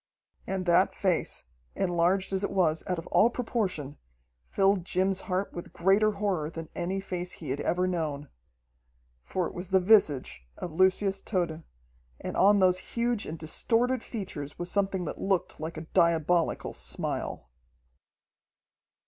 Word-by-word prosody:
And 190 -1 -2
that 175 +1 +3
face, 185 -5 0 0.3
enlarged 185 +1 +1
as 190 +1 +1
it - - 0
was 170 -5 +1
out 180 - -1
of 165 - -6
all 230 - +6
proportion, 195 - -2 0.5
filled 195 -1 +2
Jim's 185 +2 0
heart 185 +2 -1
with 175 - -8
greater 200 +4 +3
horror 195 -7 -1
than 165 -1 -8
any 185 +2 -2
face 180 -2 -4
he 155 -6 -6
had 140 - -2
ever 180 +1 +1
known. 155 -5 -2 0.9
For 180 - -2
it - - -5
was 180 +1 -5
the 190 -1 +4
visage 150 - +3
of 175 - -5
Lucius 190 +2 +2
Tode, 170 -5 -1 0.6
and - - -5
on 205 +2 +5
those 185 -1 +4 0.2
huge 235 -2 0
and 160 - -5
distorted 230 +10 +1
features 170 - -6
was 175 0 -4
something 195 -2 0
that - - -6
looked 190 -2 -1
like 160 +1 -5
a - - -4
diabolical 170 -1 +2
smile. - - -3
185 Hz, 150 wpm, -28 LUFS, 165-195 Hz, 0.9 s, all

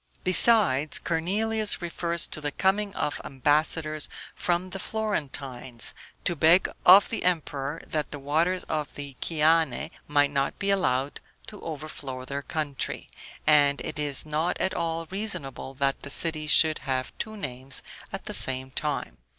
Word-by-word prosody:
Besides, 185 - +5
Cornelius 210 +6 -1
refers 170 -1 -1
to 155 - -5
the 145 - -2
coming 200 +5 +1
of 150 - -2
ambassadors 155 +3 0 0.2
from 180 +1 -1
the 195 - -5
Florentines, 135 - -2 0.3
to 175 - 0
beg 165 +4 +5 0.2
of 190 +3 +8
the 230 - -3
emperor 150 -4 -1
that 155 -2 -3
the 145 - -6
waters 160 +6 0
of 150 -2 -3
the 140 -2 -8
Chiane 160 -2 +2 0.2
might 145 -1 +3
not 140 -1 -1
be 200 0 +1
allowed 140 -8 0 0.3
to 210 - -11
overflow 145 -4 -6
their 140 +2 -4
country; 145 -2 -4 0.4
and 145 -2 +4
it 155 - -5
is 145 -1 +1
not 155 +3 -1
at 190 - 0
all 165 0 -2
reasonable 180 - -2
that 135 0 0
the 140 - -8
city 155 0 0
should 155 0 +7
have 130 -2 -3
two 220 -1 -4
names 130 -6 -3 0.3
at - - -6
the - - -5
same 130 0 +2
time. 150 - -3
155 Hz, 150 wpm, -26 LUFS, 140-175 Hz, 0.4 s, of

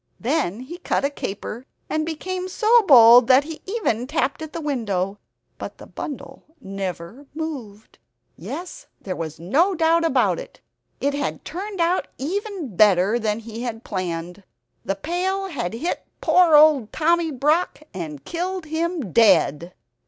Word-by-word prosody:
Then 230 - -1
he 335 +7 -9
cut 315 - 0
a 280 - 0
caper, 230 +1 -6 0.2
and 310 0 -1
became 365 +3 -4
so 450 +5 +4
bold 240 -2 +8
that 260 +2 +6
he 320 +1 -8
even 315 - -1
tapped 290 0 -1
at 315 -1 -6
the - - -5
window; 205 - -2 0.4
but - - -7
the - - -12
bundle 290 -4 -8 0.2
never 195 +6 -6
moved. 260 -10 -7 0.4
Yes 350 - -8
there 185 -2 -5
was 160 -2 -6
no 310 - +2
doubt 330 0 +3
about 330 - +2
it - - -11 0.4
it 280 +1 0
had 285 0 -3
turned 390 +3 -6
out 340 +2 +1
even 355 - -4
better 205 +2 +4
than 215 -2 -1
he 225 +1 -8
had 235 -2 -5
planned; 180 -1 -4 0.4
the 195 - -2
pail 365 - -2
had 235 - -4
hit 320 +10 -3 0.2
poor 350 -4 +5
old 295 -7 +5
Tommy 335 +1 +2
Brock, 305 +4 0
and 155 -6 -7
killed 360 +1 -3
him 320 - -3
dead! 175 -7 +4
280 Hz, 150 wpm, -22 LUFS, 210-335 Hz, 0.4 s, bold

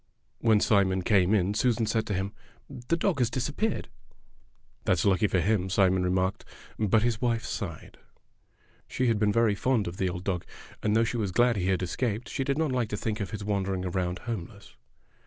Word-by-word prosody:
When 110 -2 +4
Simon 95 -3 +2
came 95 -1 +3
in 100 0 +1
Susan 115 +1 +1
said 110 +1 0
to 105 - -1
him, 95 +2 -3 0.5
"The 165 - +2
dog 170 -4 0
has 120 -3 +2
disappeared." 145 - -2 1.0
"That's 90 +1 +1
lucky 100 +1 +3
for 95 - +1
him," 95 +1 +1
Simon 95 -1 +3
remarked, 95 +1 0
72 - - -25
Fairy - - -18
Tale 110 - -4
Foxes - - -4
but 110 +2 +4
his 115 -2 0
wife'sighed. 115 - -3 0.9
She 130 - -1
had 110 -2 +1
been 105 -1 +3
very 115 0 +3
fond 115 0 0
of 85 +2 -6
the 95 - 0
old 90 0 -5
dog, 95 -3 -2 0.4
and 105 0 +1
though 115 - +4
she 115 +1 -2
was 100 -4 -1
glad 120 +4 +3
he 95 -3 -1
had 95 -1 +1
escaped 110 +5 -2
she 135 - -2
did 140 +1 -1
not 160 -3 +1
like 125 -4 0
to 105 - -3
think 110 +1 -3
of 100 -3 -3
his 105 0 -6
wandering 95 -2 -1
around 90 0 -1
homeless. 100 - -7
105 Hz, 210 wpm, -28 LUFS, 95-115 Hz, 1.0 s, When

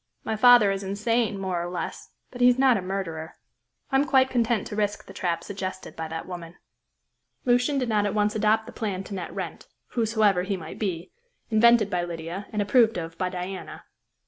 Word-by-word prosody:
"My 220 - -2
father 240 -2 +7
is 195 0 -2
insane 215 +2 0
more 185 -3 -2
or 175 - -4
less, 175 -1 -5 0.2
but 245 - -8
he 245 - +8
is 250 - +3
not 260 -2 +5
a 195 - -1
murderer. 180 -4 -4 0.6
I 270 - +4
am 280 - +3
quite 265 -3 +3
content 235 -3 +1
to 210 - -6
risk 205 -1 -1
the - - -12
trap 170 -2 -2
suggested 190 -1 -6
by 160 0 -4
that 160 +1 -6
woman." 175 -2 -8 0.9
Lucian 250 +3 +3
did 255 -2 0
not 210 -2 +2
at 205 - -3
once 210 0 +1
adopt 220 +1 +2
the 240 - -9
plan 200 -6 -3
to 200 - -9
net 180 -3 -5
Wrent - - -6 0.2
whosoever 220 -5 +2
he 195 +1 -2
might 175 - -9
be 185 -4 -3 0.4
invented 225 -1 +5
by 175 -1 0
Lydia, 170 +3 -6
and 210 -1 0
approved 225 0 +4
of 165 -1 -5
by 185 -1 0
Diana. 185 +1 -6
205 Hz, 200 wpm, -26 LUFS, 180-230 Hz, 0.9 s, he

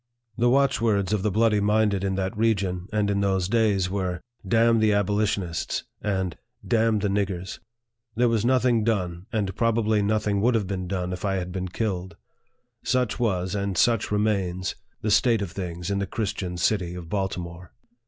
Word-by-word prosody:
The 120 +2 +2
watchwords 115 -7 +2
of 105 - +1
the 105 - +1
bloody 110 +1 +3
minded 105 -1 +2
in 95 -1 0
that 95 +3 -2
region, 100 -5 0
and 105 -1 +1
in 100 0 0
those 95 -2 +1
days, 105 -4 +2
were, 90 -2 -2 0.2
" 100 - -17
Damn 115 0 +4
the 110 -1 +3
abolitionists! 100 -3 0
" - - -47
and 95 -4 -1 0.2
" - - -18
Damn 115 -1 +3
the 105 0 0
niggers! 95 -2 -2 0.3
" 115 0 -49
There 120 +2 +3
was 115 -2 +1
nothing 125 -2 +3
done, 90 -5 -1
and 100 -4 -1
probably 110 -2 +2
nothing 105 -1 +1
would 120 +2 +3
have 110 -3 +1
been 95 -1 -4
done 90 -1 -2
if 90 - -6
I 100 -1 0
had 90 -1 -3
been 95 0 -3
killed. 95 -3 -3 0.7
Such 125 -3 0
was, 95 -6 0
and 100 -2 -2
such 115 -2 +3
remains, 100 -4 0 0.3
the 105 - 0
state 115 0 +3
of 90 - -5
things 90 0 -5
in 100 - 0
the 100 - -2
Christian 100 -4 -3
city 90 -1 0
of 90 -2 -8
Baltimore. 90 -2 -4
100 Hz, 185 wpm, -25 LUFS, 95-110 Hz, 0.7 s, Damn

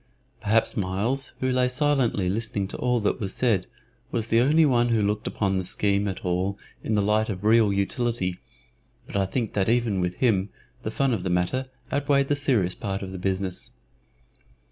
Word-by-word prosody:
Perhaps 110 +2 +2
Myles, 105 +8 -1
who 130 0 +1
lay 125 0 +2
silently 125 -7 +1
listening 100 0 -1
to - - -4
all 125 -1 +1
that 105 - 0
was 95 -3 -3
said, 110 -8 +1 0.4
was 115 -1 -2
the 115 +1 +4
only 155 +5 +4
one 120 -4 +3
who 115 -2 +2
looked 105 +1 -1
upon 95 -2 0
the 95 - -1
scheme 100 +2 +1
at 95 - -5
all 90 +3 0 0.3
in 110 - 0
the 105 - +2
light 110 +2 +2
of 95 -1 -4
real 110 -1 +5
utility, 100 -2 -1 0.7
but - - -10
I 100 -1 +1
think 115 +1 -2
that 100 0 +1
even 115 -5 +1
with 90 0 -1
him 105 -5 +1 0.3
the - - -3
fun 135 +3 +1
of 105 - -1
the 90 - -3
matter 90 +10 0 0.2
outweighed 140 -1 +2
the 145 - +3
serious 120 -11 +2
part 100 -1 -4
of 95 - -6
the 95 - -6
business. 95 0 -2
105 Hz, 190 wpm, -25 LUFS, 95-125 Hz, 0.7 s, real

